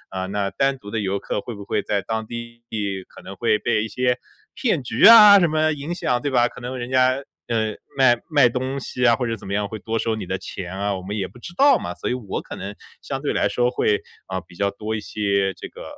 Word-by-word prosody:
嗯， 95 +1 -3
那 100 -1 -1
单 135 0 +1
独 105 -4 -11
的 110 - -1
游 100 -1 -1
客 100 - -3
会 120 - -7
不 100 -1 -9
会 - - 0
在 100 -1 -1
当 110 -1 -3
地 120 0 -8 0.5
可 - - -15
能 95 - -8
会 110 0 +2
被 110 -2 0
一 - - -3
些 125 +1 0 0.4
骗 180 - 0
局 120 - +2
啊 210 -3 +10
什 175 - +4
么 155 0 +2
影 150 +4 -5
响 125 -7 0
对 145 - -1
吧？ 120 -2 +3
可 - - -11
能 125 +1 -5
人 120 +1 -5
家， 130 +1 +3 0.2
呃， 110 -2 0 0.2
卖 130 -3 +6
卖 145 -5 +5
东 130 +3 -3
西 125 -1 -4
啊， 115 -1 +6
或 125 - -2
者 115 -1 -1
怎 100 - -12
么 100 - -3
样 105 -1 0
会 110 0 -7
多 115 +3 -2
收 110 0 0
你 105 - -6
的 95 0 -2
钱 90 -2 -7
啊， 100 0 -1
我 95 - -6
们 100 +3 -5
也 95 -2 -2
不 110 +7 -16
知 170 - -9
道 280 -1 +6
嘛。 - - -5
所 - - -5
以 - - 0
我 115 -6 -4
可 - - -9
能 100 +1 -7 0.3
相 135 - -4
对 145 - -1
来 - - +1
说 125 0 +1
会， 105 -4 +2 0.3
嗯， 95 -2 -3
比 85 - -16
较 100 +2 +1
多 105 +2 -4
一 - - -2
些 100 -2 0
这 - - -8
个 - - -11
115 Hz, 280 characters per minute, -22 LUFS, 100-130 Hz, 0.5 s, 啊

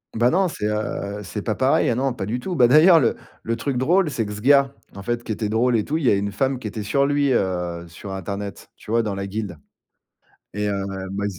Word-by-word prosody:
Bah, 120 +2 +3
non, 190 +6 +2
c'est, 105 -10 -3
heu, 105 -1 -3
c'est - - -5
pas - - -2
pareil. - - +2
Ah 115 - +1
non, 135 0 0
pas 100 -6 -5
du 120 +4 -2
tout, 180 +7 -4
bah, 125 -6 +6
d'ailleurs, 160 +6 +7
le 120 -6 +2 0.3
le 115 - -2
truc 130 +3 -2
drôle, 170 +6 +2
c'est 115 -5 -2
que - - -6
ce 105 - -7
gars, 140 +2 +5 0.2
en 100 - -7
fait, 120 +3 -2
qui - - -5
était 110 0 -2
drôle 120 +3 +2
et 110 - +2
tout, 155 - -1
il 160 - -4
y - - +5
a - - +5
une 100 0 -1
femme 130 +5 0
qui 115 - -5
était 105 0 -5
sur 140 +7 +2
lui, 145 -2 +2
heu, 90 -5 -1
sur 90 +4 -9
internet, 100 +1 -6
tu - - -10
vois, 115 +1 +3
dans 105 -3 -3
la 100 0 -3
guilde 100 -3 -5 1.0
et 105 +1 -2
heu, 100 - 0 0.4
bah, 100 +1 -3
115 Hz, 260 wpm, -22 LUFS, 100-135 Hz, 1.0 s, d'ailleurs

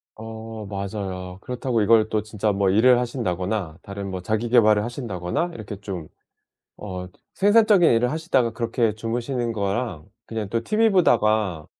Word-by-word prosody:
어 110 -1 -8
맞아요. 95 -2 -5
그렇다고 125 -2 -1
이걸 110 +1 +4
또 110 -1 0
진짜 105 -1 -1
뭐 100 -1 +1
일을 120 +5 +5
하신다거나 95 -7 -3
다른 100 -1 -6
뭐 95 -1 -4
자기 110 +5 -1
계발을 110 -3 +5
하신다거나 120 - -3
이렇게 105 -2 -8
좀 90 -6 -6 0.7
어 90 -3 -6 0.3
생산적인 205 -3 +5
일을 120 +2 +2
하시다가 135 -8 +1
그렇게 115 -2 0
주무시는 120 +2 -2
거랑 100 -5 -2 0.2
그냥 110 -3 -4
또 115 +2 -2
티브이보다가 110 - +2
110 Hz, 340 characters per minute, -23 LUFS, 100-120 Hz, 0.7 s, 일을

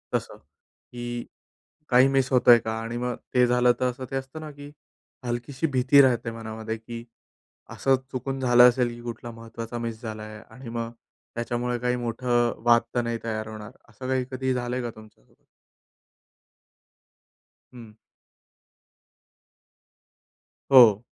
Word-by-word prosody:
तसं - - -3
की 120 0 -9 0.6
काही 130 +1 +6
मिस 135 -1 +2
होतो 125 -1 +5
आहे 120 - +10
का? 110 0 -4
आणि 115 +1 -5
मग 125 0 -1 0.2
ते 125 -1 +5
झालं, 125 0 +4
तर 130 - +2
असं 125 +1 -8
ते 135 - -3
असतं 135 +4 -6
ना 155 -1 -7
की 145 0 -11 0.5
हलकीशी 120 +5 -2
भीती 135 0 +4
राहते 120 -3 +2
मनामध्ये 110 0 -6
की 115 +1 -9 0.7
असं 135 -1 +2 0.2
चुकून 135 +1 -4
झालं 125 -1 +7
असेल 125 0 0
की 120 - -11
कुठला 120 0 -7
महत्त्वाचा 115 +1 -8
मिस 115 -1 -5
झाला 110 -2 -6
आहे 110 0 -9
आणि 125 0 -10
मग 115 0 -4 0.4
त्याच्यामुळे 120 +1 -2
काही 125 +1 0
मोठं 120 0 +1
वाद 120 0 +6
तर 120 - +3
नाही 115 0 -2
तयार 110 -1 -3
होणार. 110 -1 -8 0.2
असं 125 +3 -9
काही 130 -1 0
कधी 130 0 -4
ही 130 - +3
झालंय 125 0 -2
का 120 - -3
तुमच्यासोबत? 110 -1 -19 2.3
हं. 115 -3 -11 2.8
हो. 115 -5 +8
120 Hz, 145 wpm, -25 LUFS, 115-125 Hz, 2.8 s, आहे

